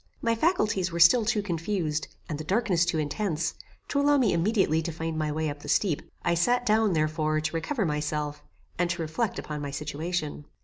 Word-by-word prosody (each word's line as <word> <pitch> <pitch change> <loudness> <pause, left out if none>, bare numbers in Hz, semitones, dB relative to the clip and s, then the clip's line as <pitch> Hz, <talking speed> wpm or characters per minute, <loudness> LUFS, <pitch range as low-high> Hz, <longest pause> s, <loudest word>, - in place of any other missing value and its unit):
My 230 - +1
faculties 215 - +1
were 170 - -3
still 215 +8 +7
too 215 -2 +1
confused, 165 -3 -2 0.2
and 150 -4 -4
the - - -4
darkness 185 -1 +2
too 170 -2 0
intense, 160 +2 -1 0.4
to 280 - +1
allow 290 0 +4
me 240 -9 +3
immediately 170 -2 +2
to 170 - -3
find 160 0 -4
my 155 -1 -1
way 155 +1 -1
up 145 0 -4
the - - -9
steep. 175 -8 +2 0.2
I - - +2
sat 245 +9 +2
down, 215 -3 +3
therefore, 155 0 +1
to 155 +2 -3
recover 220 - -1
myself, 150 -1 -2 0.4
and 175 -1 +2
to 170 0 -2
reflect 195 +7 -2
upon 150 -1 -5
my 145 - -3
situation. 150 +1 -3
170 Hz, 195 wpm, -27 LUFS, 155-210 Hz, 0.4 s, still